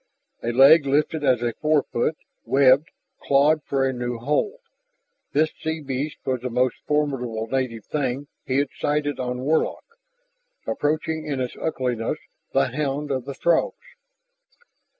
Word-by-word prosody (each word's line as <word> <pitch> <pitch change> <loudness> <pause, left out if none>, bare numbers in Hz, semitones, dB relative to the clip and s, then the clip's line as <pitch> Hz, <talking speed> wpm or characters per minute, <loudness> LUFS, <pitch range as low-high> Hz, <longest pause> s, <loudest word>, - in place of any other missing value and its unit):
A 120 - -1
leg 140 +4 +7
lifted 150 +2 +1
as 125 -4 +3
a 120 -1 0
forefoot, 150 -2 +1 0.3
webbed, 135 +3 +4 0.3
clawed 145 +3 +3
for 135 -2 0
a 130 - -1
new 120 -1 -3
hold. 150 - -1 0.7
This 155 +2 +2
sea 160 0 -2
beast 140 +1 -3
was 130 -2 -1
the 125 - -3
most 125 +1 +1
formidable 130 -7 0
native 115 -2 -2
thing 140 -2 -2 0.2
he 130 - -1
had 140 -1 +1
sighted 145 -1 0
on 125 0 -3
Warlock, 155 +4 0 0.8
approaching 155 +1 -1
in 140 -3 -2
its 125 -1 -3
ugliness 125 -7 -2 0.3
the 70 - +2
hound 145 +1 -2
of 130 -2 -2
the 140 - -6
Throgs. 170 +3 +1
140 Hz, 140 wpm, -24 LUFS, 125-150 Hz, 0.8 s, leg